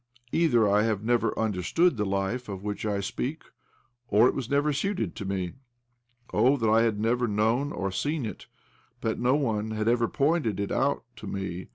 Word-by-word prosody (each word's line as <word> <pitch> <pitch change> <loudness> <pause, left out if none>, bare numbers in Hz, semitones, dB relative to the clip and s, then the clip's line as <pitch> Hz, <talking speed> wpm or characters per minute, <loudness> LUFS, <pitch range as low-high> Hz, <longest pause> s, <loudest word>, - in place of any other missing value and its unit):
Either 125 -10 +3
I 100 +1 +4
have 110 -2 0
never 120 +1 +1
understood 110 - +1
the 105 -2 -1
life 100 +5 -2
of 95 -2 -5
OBLOMOV - - -15
159 - - -5
which 105 - -4
I 100 -1 0
speak 150 +9 -3 0.6
or 110 +4 +5
it - - +1
was 125 -3 -4
never 145 +1 +2
suited 140 - -2
to 100 - -6
me. 95 -2 -2 0.8
Oh, 135 +3 +4
that 110 -4 +1
I 110 +1 +5
had 110 -3 +1
never 120 +3 +1
known 115 +7 +1
or 95 -8 -3
seen 145 +6 -1
it, 110 - -7 0.5
that 110 - -1
no 125 +3 +3
one 110 -7 0
had 110 0 -2
ever 120 0 +3
pointed 140 - +1
it 100 - -2
out - - +1
to - - -8
me 95 -2 -4
110 Hz, 200 wpm, -27 LUFS, 105-130 Hz, 0.8 s, or